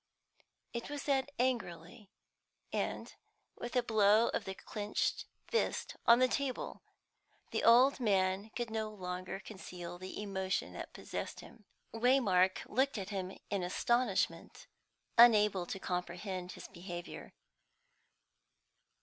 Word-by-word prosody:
It 235 Hz, +2 st, -4 dB
was 290 Hz, -1 st, -4 dB
said 275 Hz, -1 st, +1 dB
angrily, 215 Hz, -5 st, -2 dB, 0.6 s
and -, -, -2 dB, 0.4 s
with 240 Hz, +2 st, -6 dB
a 250 Hz, -, +3 dB
blow 220 Hz, 0 st, +4 dB
of -, -, -2 dB
the 190 Hz, -, -5 dB
clenched 210 Hz, +1 st, -2 dB, 0.2 s
fist 465 Hz, -, -1 dB
on 235 Hz, -, +9 dB
the 255 Hz, +1 st, +5 dB
table. 270 Hz, 0 st, -3 dB, 0.7 s
The -, -, -1 dB
old 250 Hz, +5 st, +6 dB
man 195 Hz, -2 st, +1 dB
could 240 Hz, -2 st, -3 dB
no 220 Hz, -1 st, -2 dB
longer 185 Hz, -2 st, -5 dB
conceal 180 Hz, -3 st, -8 dB
the 185 Hz, +2 st, -7 dB
emotion 190 Hz, -2 st, -2 dB
that -, -, -7 dB
possessed -, -, -5 dB
him. 225 Hz, -3 st, -15 dB, 0.3 s
Waymark 225 Hz, -6 st, +3 dB
looked 265 Hz, +2 st, +1 dB
at 195 Hz, -1 st, -4 dB
him 190 Hz, -2 st, -4 dB
in 200 Hz, -2 st, 0 dB
astonishment, 240 Hz, +7 st, 0 dB, 0.5 s
unable 210 Hz, -6 st, +6 dB
to 195 Hz, -, -4 dB
comprehend 180 Hz, +1 st, -4 dB
his -, -, -9 dB
behaviour. 175 Hz, 0 st, -8 dB
205 Hz, 120 wpm, -34 LUFS, 185-240 Hz, 0.7 s, on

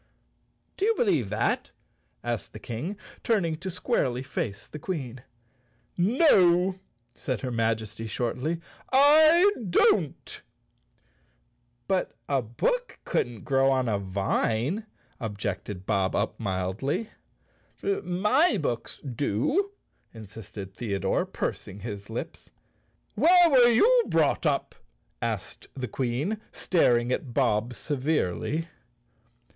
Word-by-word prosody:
"Do 390 Hz, -, +1 dB
you 450 Hz, +1 st, +3 dB
believe 160 Hz, -, +1 dB
that?" 105 Hz, +2 st, 0 dB, 0.5 s
asked 120 Hz, -2 st, -3 dB
the 110 Hz, -, -8 dB
King, 130 Hz, -, -5 dB, 0.3 s
turning 190 Hz, -9 st, +1 dB
to 190 Hz, +4 st, -5 dB
squarely 165 Hz, -, -1 dB
face 105 Hz, -6 st, -4 dB
the 150 Hz, -, -9 dB
Queen. 135 Hz, -8 st, -5 dB, 0.7 s
"No!" 185 Hz, -, +4 dB, 0.3 s
said 130 Hz, -, -4 dB
her 130 Hz, -, -3 dB
Majesty 110 Hz, -1 st, -1 dB
shortly, 125 Hz, +9 st, -2 dB, 0.3 s
"I 310 Hz, +7 st, +7 dB, 0.2 s
don't." 170 Hz, -3 st, +2 dB, 1.5 s
"But 185 Hz, -11 st, -1 dB
a 140 Hz, -2 st, +1 dB
bo(Ok -, -, -1 dB
couldn't 120 Hz, -3 st, -2 dB
grow 135 Hz, -1 st, +3 dB
on 130 Hz, -2 st, +1 dB
a 105 Hz, -3 st, 0 dB
vine," 110 Hz, -, -1 dB, 0.3 s
objected 100 Hz, -4 st, -4 dB
Bob 95 Hz, -1 st, +1 dB
Up 105 Hz, -, -1 dB
mildly. 105 Hz, -, -2 dB, 0.7 s
"My 255 Hz, -, +2 dB
books 125 Hz, -9 st, -3 dB
do," 140 Hz, -, 0 dB, 0.5 s
insisted 105 Hz, -2 st, -9 dB
Theodore, 100 Hz, -1 st, -1 dB
pursing 95 Hz, -, -4 dB
up -, -, -12 dB
his 100 Hz, -3 st, -6 dB
lips. -, -, -6 dB, 0.6 s
"Where 345 Hz, -, +6 dB
were 245 Hz, -3 st, +7 dB
you 475 Hz, -, +5 dB
brought -, -, +2 dB
up?" -, -, 0 dB, 0.5 s
asked -, -, -4 dB
the 130 Hz, -2 st, -4 dB
Queen, 135 Hz, -, -2 dB
staring 120 Hz, -9 st, +2 dB
at 125 Hz, -2 st, -3 dB
Bob 120 Hz, -2 st, +1 dB
severely. 150 Hz, -, -1 dB
135 Hz, 110 wpm, -27 LUFS, -, 1.5 s, I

